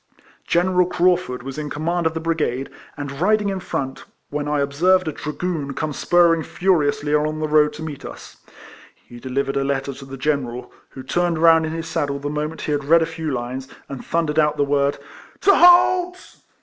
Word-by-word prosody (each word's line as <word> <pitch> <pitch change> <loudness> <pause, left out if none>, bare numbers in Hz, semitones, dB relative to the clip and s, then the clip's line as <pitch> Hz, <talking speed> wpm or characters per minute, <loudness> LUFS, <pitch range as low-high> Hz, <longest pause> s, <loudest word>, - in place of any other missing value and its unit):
General 180 +1 +2
Craufurd 175 -9 +1
was 135 +2 -6
in 150 -1 -4
command 165 +3 -1
of 160 - -4
the - - -1
brigade, 155 -5 -2 0.3
and 140 0 -6
riding 210 +1 +2
in 195 -1 -3
front, 135 -7 -5 0.3
when 145 0 -3
I 150 0 0
observed 170 +6 +2
a - - 0
dragoon 150 -2 -4
come 155 -1 -3
spurring 170 +1 +3
furiously 150 -5 0
along 155 +1 +1
the 155 0 -2
road 150 0 +4
to 155 +2 -8
meet 150 -3 -7
us. - - -10 0.6
He 120 - -15
delivered 135 +2 -2
a 135 - +1
letter 140 0 -2
to 135 +1 -11
the 135 0 -9
General, 130 -3 -2 0.2
who 130 - -10
turned 175 +5 0
round 165 0 +5
in 160 - -4
his 165 0 -4
saddle 145 -4 -2
the 145 +1 -4
moment 150 +2 -4
he - - -3
had 145 -1 -1
read 165 +2 +5
a - - 0
few 160 -1 -5
lines, 130 0 -4 0.2
and 135 -2 -7
thundered 160 -2 0
out 150 -1 +2
the - - +2
word 140 0 +1 0.2
" - - -23
to 400 - +5
halt 360 +1 +4
150 Hz, 200 wpm, -21 LUFS, 140-170 Hz, 0.6 s, round